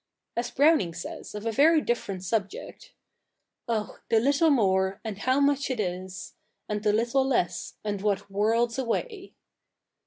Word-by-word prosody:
As 240 Hz, +1 st, -1 dB
Browning 285 Hz, -, +3 dB
says 175 Hz, -, -7 dB
of 210 Hz, +1 st, -6 dB
a 225 Hz, -, 0 dB
very 310 Hz, +7 st, +5 dB
different 200 Hz, -8 st, -2 dB
subject 215 Hz, -, -4 dB, 0.4 s
— -, -, -55 dB
Oh, 220 Hz, -2 st, -2 dB
the 225 Hz, -, +4 dB
little 280 Hz, +7 st, +3 dB
more, 190 Hz, -7 st, +2 dB
and 210 Hz, -3 st, -5 dB
how 260 Hz, +4 st, +2 dB
much 280 Hz, 0 st, +2 dB
it 255 Hz, -3 st, -2 dB
is, 185 Hz, -1 st, -4 dB, 0.3 s
And 210 Hz, -1 st, -2 dB
the 210 Hz, -1 st, +2 dB
little 235 Hz, +5 st, +2 dB
less, 180 Hz, -10 st, -1 dB
and 205 Hz, -2 st, -3 dB
what 200 Hz, -2 st, 0 dB
worlds 225 Hz, +5 st, +1 dB
away. 390 Hz, -, -3 dB
225 Hz, 155 wpm, -27 LUFS, 195-270 Hz, 0.4 s, very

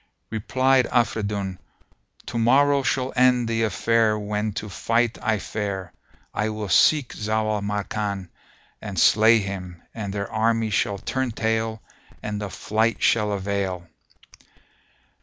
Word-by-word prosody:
Replied 130 Hz, +4 st, +2 dB
Afridun, 100 Hz, -5 st, -1 dB, 0.7 s
"To 115 Hz, -, -3 dB
morrow 140 Hz, +4 st, +4 dB
shall 130 Hz, 0 st, -1 dB
end 125 Hz, -1 st, +4 dB
the 115 Hz, 0 st, 0 dB
affair 115 Hz, 0 st, +2 dB
when 105 Hz, +1 st, -2 dB
to 105 Hz, -, -5 dB
fight 115 Hz, +4 st, 0 dB
I 110 Hz, -2 st, +1 dB
fare: 100 Hz, -3 st, -4 dB, 0.4 s
I 110 Hz, 0 st, -1 dB
will 105 Hz, -2 st, -5 dB
seek 140 Hz, -, +4 dB
Zau 110 Hz, +1 st, -1 dB
al 105 Hz, -, -2 dB
Makan 100 Hz, -2 st, -3 dB, 0.5 s
and -, -, -6 dB
slay 110 Hz, +2 st, +6 dB
him, 95 Hz, -4 st, -5 dB
and 105 Hz, -3 st, -5 dB
their 100 Hz, 0 st, -4 dB
army 115 Hz, 0 st, +1 dB
shall 100 Hz, 0 st, 0 dB
turn 130 Hz, +6 st, -2 dB
tail 110 Hz, -1 st, -2 dB, 0.4 s
and 105 Hz, -1 st, -3 dB
of 100 Hz, -2 st, -5 dB
flight 110 Hz, +2 st, 0 dB
shall 105 Hz, -2 st, +3 dB
avail." 95 Hz, -3 st, -2 dB
110 Hz, 130 wpm, -24 LUFS, 100-115 Hz, 0.7 s, slay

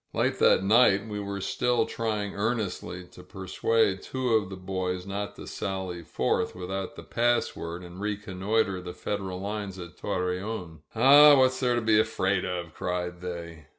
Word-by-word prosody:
Late -, -, 0 dB
that -, -, +5 dB
night 105 Hz, -1 st, +4 dB
we 105 Hz, -1 st, -4 dB
were 100 Hz, 0 st, -4 dB
still 120 Hz, +3 st, +1 dB
trying 105 Hz, -3 st, -2 dB
earnestly 100 Hz, -4 st, -2 dB
to -, -, -13 dB
persuade 95 Hz, +2 st, 0 dB
two 130 Hz, -1 st, -3 dB
of 105 Hz, -4 st, +2 dB
the 95 Hz, -, -6 dB
boys 95 Hz, -1 st, -3 dB
not 100 Hz, +1 st, -4 dB
to -, -, -9 dB
sally 95 Hz, -3 st, -4 dB
forth 80 Hz, +3 st, -1 dB
without 95 Hz, +1 st, -5 dB
the -, -, -9 dB
pass 120 Hz, 0 st, +1 dB
word 85 Hz, +2 st, -6 dB
and 90 Hz, +2 st, -10 dB
reconnoiter 105 Hz, -1 st, -1 dB
the 90 Hz, 0 st, -8 dB
Federal 95 Hz, -3 st, -4 dB
lines 100 Hz, -1 st, -4 dB
at 85 Hz, -1 st, -9 dB
Torreon. 90 Hz, -2 st, -3 dB, 0.2 s
"Aw, 145 Hz, +5 st, +8 dB
what's 130 Hz, -1 st, +3 dB
there 125 Hz, -2 st, +2 dB
to 120 Hz, -, 0 dB
be 110 Hz, -1 st, +4 dB
afraid 95 Hz, -4 st, +1 dB
of?" 90 Hz, -3 st, -4 dB
cried 90 Hz, 0 st, -3 dB
they. 85 Hz, -3 st, -7 dB
95 Hz, 165 wpm, -27 LUFS, 90-110 Hz, 0.2 s, Aw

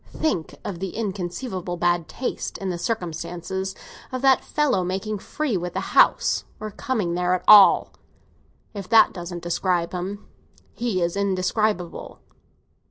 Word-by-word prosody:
Think 240 Hz, -, -2 dB
of 180 Hz, -4 st, -5 dB
the 190 Hz, -1 st, -5 dB
inconceivable 185 Hz, -2 st, -4 dB
bad 175 Hz, -1 st, +1 dB
taste, 255 Hz, -, -4 dB
in 195 Hz, -1 st, -3 dB
the 175 Hz, -, -4 dB
circumstances, 190 Hz, -1 st, -4 dB, 0.4 s
of 255 Hz, 0 st, -4 dB
that 270 Hz, -1 st, +5 dB
fellow 275 Hz, -11 st, +1 dB
making 195 Hz, +4 st, -3 dB
free 295 Hz, +2 st, -2 dB
with 175 Hz, 0 st, -4 dB
the -, -, -4 dB
house—or 215 Hz, -1 st, +2 dB
coming 215 Hz, -8 st, -2 dB
there 180 Hz, +1 st, +1 dB
at 185 Hz, -, -5 dB
all! 210 Hz, -2 st, +8 dB, 0.8 s
If 200 Hz, -3 st, -7 dB
that 225 Hz, -, +6 dB
doesn't 175 Hz, -1 st, -7 dB
describe 175 Hz, 0 st, 0 dB
him, 190 Hz, +3 st, -5 dB, 0.5 s
he 220 Hz, -7 st, -1 dB
is 170 Hz, +1 st, -1 dB
indescribable." 195 Hz, -1 st, -1 dB
190 Hz, 135 wpm, -23 LUFS, 175-215 Hz, 0.8 s, all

